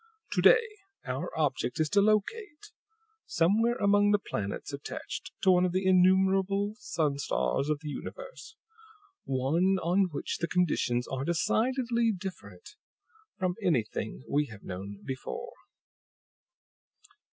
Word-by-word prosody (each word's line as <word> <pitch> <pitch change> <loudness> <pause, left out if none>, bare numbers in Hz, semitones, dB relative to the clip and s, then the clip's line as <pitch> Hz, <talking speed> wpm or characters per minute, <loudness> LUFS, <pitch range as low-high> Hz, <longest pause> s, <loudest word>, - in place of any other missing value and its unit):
To - - +1
day, 465 -1 +6 0.4
our - - -3
object - - -1
is 155 - +2
to 200 - +5
locate, 300 - -1 0.6
somewhere 220 +8 +2
among 205 -2 +3
the 205 - +5
planets 100 - -5
attached - - -6
to 190 - +6
one 180 0 +4
of 180 -1 0
the 185 +1 0
innumerable 190 +2 +3
sun 160 - -1
stars 65 - 0
of 150 -1 -1
the 155 - -6
universe, - - -8 0.7
one 160 +9 +1
on 185 +3 +2
which 145 - -4
the 170 - -1
conditions 140 -9 0
are 135 0 -3
decidedly 230 - +1
different 180 - -8 0.7
from 185 -1 0
anything 110 - -1
we 145 +1 +1
have 105 -4 -12
known 100 +2 -7
before." 465 - -6
185 Hz, 125 wpm, -29 LUFS, 140-210 Hz, 0.7 s, day